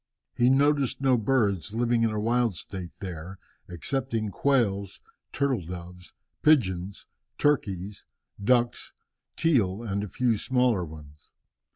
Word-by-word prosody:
He 120 +1 +3
noticed 140 0 +2
no 135 -2 +3
birds 110 -5 0
living 120 0 +2
in 115 - +3
a 105 -1 -2
wild 115 -1 +1
state 90 0 -7
there 90 0 -7 0.3
excepting 110 - -2
quails, 100 -6 0 0.3
turtle 135 -6 0
doves, 90 +1 -9 0.3
pigeons, 100 - +2 0.3
turkeys, 100 -9 0 0.4
ducks, 120 +1 +1 0.4
teal, 115 - +1
and 100 -2 -2
a - - -4
few 115 +2 0
smaller 125 -6 +2
ones. 75 -2 -12
110 Hz, 115 wpm, -27 LUFS, 95-125 Hz, 0.4 s, He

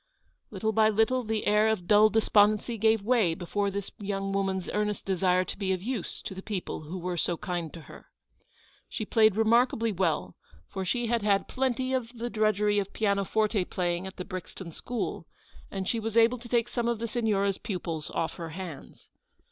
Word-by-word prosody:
Little 220 +2 -1
by 220 0 +4
little 225 +4 +2
the 220 -1 -2
air 210 +1 +4
of 220 -5 0
dull 210 +2 +6
despondency 215 +1 +3
gave 220 -1 +3
way 215 -7 +3
before 200 +3 -1
this 200 0 -5
young 195 -1 -2
woman's 190 -2 -1
earnest 210 0 -1
desire 185 -1 +2
to - - -5
be 190 -2 -1
of 185 -1 -4
use 235 -4 -4
to - - -5
the 190 - -7
people 195 -3 -4
who 160 +5 -6
were 180 0 -3
so 170 +2 0
kind 175 -5 -3
to 165 - -9
her. - - -14 0.8
She 215 - -4
played 220 -2 +4
remarkably 230 +1 +3
well, 165 - -1 0.3
for 190 - -4
she 240 +6 0
had 235 0 +1
had 200 -1 +2
plenty 260 0 -1
of 250 -2 -2
the 240 +1 -4
drudgery 210 -1 +2
of 195 -1 -4
pianoforte 205 0 +1
playing 175 0 -2
at 190 - -10
the 180 - -5
Brixton 185 -2 -7
school, 205 -3 -4 0.4
and 190 -1 -4
she 230 - 0
was 225 0 -2
able 235 +2 +5
to 235 0 -11
take 235 -1 +2
some 240 -1 -2
of 235 -1 +1
the 230 +2 -3
Signora' 215 -4 +1
s 195 - -2
pupils 170 -6 -4
off 165 - -2
her 165 -2 -5
hands. 165 -3 -9
205 Hz, 195 wpm, -28 LUFS, 185-225 Hz, 0.8 s, dull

